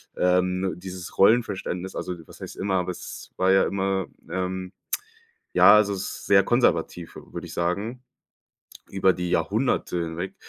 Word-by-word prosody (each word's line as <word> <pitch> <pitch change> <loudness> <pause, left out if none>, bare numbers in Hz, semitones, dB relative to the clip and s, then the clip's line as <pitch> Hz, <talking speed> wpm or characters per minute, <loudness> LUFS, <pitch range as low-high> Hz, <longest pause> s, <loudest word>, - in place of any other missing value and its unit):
ähm 90 0 +1
dieses 90 -1 -8
Rollenverständnis. 95 -4 +2
Also, 90 - -3
was - - -14
heißt - - -8
immer, 95 0 -1
aber 90 0 0
es - - -9
war 95 +1 +3
ja 95 - +5
immer, 95 0 0 0.2
ähm, 95 +1 -3 0.8
ja, - - +8
also 100 -2 +3
sehr 100 +1 +2
konservativ, 90 -8 +1
würde - - -8
ich - - -9
sagen. 100 +9 -2 0.9
Über 95 -1 +3
die 90 -1 -3
Jahrhunderte 110 -5 0
hinweg, 85 +3 -5
95 Hz, 135 wpm, -25 LUFS, 90-100 Hz, 0.9 s, ja